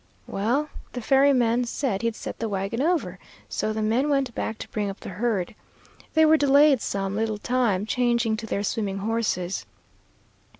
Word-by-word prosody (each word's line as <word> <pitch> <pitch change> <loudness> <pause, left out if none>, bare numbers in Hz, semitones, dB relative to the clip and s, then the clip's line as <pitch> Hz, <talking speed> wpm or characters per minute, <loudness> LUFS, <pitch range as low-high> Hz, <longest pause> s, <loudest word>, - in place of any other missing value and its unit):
"Well, 245 +10 -1 0.2
the 245 - -4
ferryman 250 -3 +3
said 235 -4 -2
he'd 230 -1 -1
set - - -7
the 225 - -2
wagon 195 +4 -2
over, 340 +2 0 0.3
so 215 - -2
the 215 0 -2
men 240 +7 +1
went 275 -4 +1
back 220 - -3
to - - -8
bring 205 -2 -2
up 195 - -8
the - - -7
herd. 200 -1 -1 0.6
They 315 0 +6
were 315 0 +6
delayed 285 -2 +5
some 195 0 -2
little 220 0 -1
time, 220 -4 0
changing 235 -1 +1
to 225 0 -6
their 200 - -1
swimming 200 -2 -2
horses. 195 -4 -2
230 Hz, 170 wpm, -25 LUFS, 205-260 Hz, 0.6 s, They